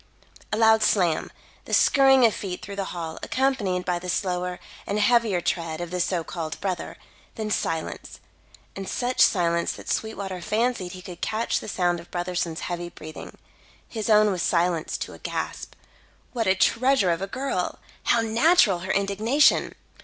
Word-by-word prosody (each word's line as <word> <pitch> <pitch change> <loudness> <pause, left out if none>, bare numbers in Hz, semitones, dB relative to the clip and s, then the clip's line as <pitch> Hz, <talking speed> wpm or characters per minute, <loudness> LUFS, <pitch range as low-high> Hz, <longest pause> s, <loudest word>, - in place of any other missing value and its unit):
A 210 - 0
loud 220 0 +5
slam 180 -6 +2 0.4
the - - +1
skurrying 270 -3 +5
of 225 - +4
feet 185 -3 -5
through 200 - -7
the 195 -1 -2
hall, 165 -3 -6
accompanied 225 -9 0
by 175 -1 0
the 180 +1 -7
slower 180 -1 -1 0.3
and 205 - -1
heavier 215 -4 +3
tread 165 -2 -2
of 175 -1 -5
the 180 - -2
so 175 -1 0
called 160 -1 -5
brother, 185 -3 -4 0.4
then 215 -2 -4
silence, 160 -5 -3 0.6
and 195 -1 -6
such 250 +1 -1
silence 170 -3 +3
that - - -7
Sweetwater 195 -4 -3
fancied 215 -2 -1
he 185 -1 -10
could 180 -3 -10
catch 225 +1 0
the - - -9
sound 175 -4 0
of 170 - -13
Brotherson's 175 -2 -3
heavy 175 -1 -4
breathing. 155 -2 -10 0.5
His 220 -1 -4
own 215 -1 +5
was 180 -2 -2
silenced 170 -2 0
to - - -5
a - - -12
gasp. - - -5 0.6
What 230 -4 -1
a 190 - +4
treasure 230 0 +3
of 170 - -1
a 195 - -2
girl! 265 +6 -2 0.3
How 235 - +3
natural 225 - +4
her 185 +2 -3
indignation! 210 +9 +2
190 Hz, 170 wpm, -25 LUFS, 175-220 Hz, 0.6 s, loud